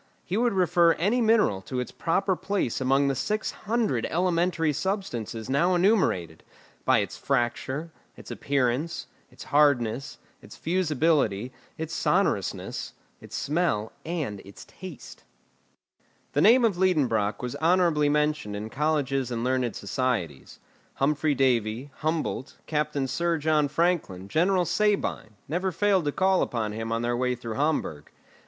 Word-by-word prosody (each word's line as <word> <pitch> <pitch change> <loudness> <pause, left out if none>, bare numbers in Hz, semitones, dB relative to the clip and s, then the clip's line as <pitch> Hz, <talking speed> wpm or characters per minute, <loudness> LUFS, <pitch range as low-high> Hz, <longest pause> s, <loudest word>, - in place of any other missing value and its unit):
He 180 - -3
would 235 +1 +2
refer 175 -2 +4
any 215 +9 +1
mineral 220 - +3
to 125 +6 -4
its 125 - -4
proper 190 +3 0
place 190 - -2
among 135 +2 +3
the 135 - +1
six 210 +12 -2
hundred 215 - -1
elementary 170 -2 +1
substances 140 - -3
now 170 +8 +2
enumerated, 175 - +1 0.4
by - - +4
its - - -5
fracture, 135 +4 -1 0.3
its - - -11
appearance, 140 +4 -1 0.2
its - - -12
hardness, 140 -3 +2 0.2
its - - -13
fusibility, 150 - +1 0.2
its 160 +1 -5
sonorousness, - - -1 0.3
its - - -9
smell, 145 -8 0
and 155 - -3
its 100 +1 -13
taste. 185 -7 -11 1.1
The 145 - +2
name 235 +6 +6
of 205 -6 +1
Liedenbrock 125 - +1
was 125 - -3
honourably 165 -3 +3
mentioned 150 -8 0
in 105 +2 -6
colleges 135 -3 0
and 120 -1 -3
learned 125 -3 0
societies. 100 - -3 0.4
Humphry 145 +1 +1
Davy, 125 0 0
Humboldt, 155 -4 -2
Captain 150 -3 -1
Sir 170 +4 0
John 155 -1 +2
Franklin, 150 - 0
General 180 - +2
Sabine, 185 - 0
never 180 +5 -1
failed 190 -1 +2
to 145 - +1
call 190 +3 +2
upon 110 -3 -1
him 115 +1 -4
on 115 +1 -1
their 120 0 0
way 125 0 0
through 115 -2 -6
Hamburg. 140 - -1
150 Hz, 135 wpm, -26 LUFS, 120-175 Hz, 1.1 s, name